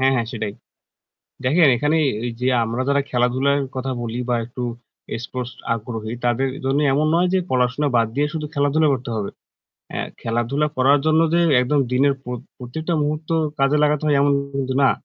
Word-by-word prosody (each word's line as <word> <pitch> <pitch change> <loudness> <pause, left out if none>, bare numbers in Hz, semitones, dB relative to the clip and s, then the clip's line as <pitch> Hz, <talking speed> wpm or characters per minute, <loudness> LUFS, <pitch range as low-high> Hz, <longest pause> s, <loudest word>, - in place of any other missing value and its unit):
হ্যাঁ, 135 0 +4
হ্যাঁ, 120 -3 0
সেটাই 110 -3 -3 0.9
দেখেন 155 +4 +5
এখানে 150 +5 +1 0.3
এই 120 - -1
যে 125 - +1 0.2
আমরা 115 +3 -2
যারা 140 0 +3
খেলাধুলার 130 +3 +2 0.2
কথা 130 +1 -2
বলি 115 0 -4
বা 125 - +2
একটু 125 +2 -7 0.6
স্পোর্টস 125 0 -5 0.2
আগ্রহী 110 -1 -5
তাদের 120 +2 +1 0.2
জন্য 135 +2 +1
এমন 150 +3 +2
নয় 175 +2 +3
যে - - +4
পড়াশোনা 125 +3 +1
বাদ 115 - +3
দিয়ে 145 +1 +2
শুধু 155 -2 -3
খেলাধুলা 145 +2 +2
করতে 130 -1 -3
হবে। 100 -2 -3 0.6
অ্যা - - -2 0.2
খেলাধুলা 120 +6 0
করার 135 +3 +4
জন্য 155 0 +4
যে 170 - +4 0.2
একদম 140 +3 +2
দিনের 140 +2 +3
প্রত 125 -1 -5 0.2
প্রত্যেকটা 160 +7 -3
মুহূর্ত 150 +1 -2 0.3
কাজে 135 +2 +3
লাগাতে 150 0 +2
হয় 145 -2 +3
এমন 140 0 +3 0.2
কিন্তু 130 -1 -2
না। 135 - +6
135 Hz, 175 wpm, -21 LUFS, 120-145 Hz, 0.9 s, না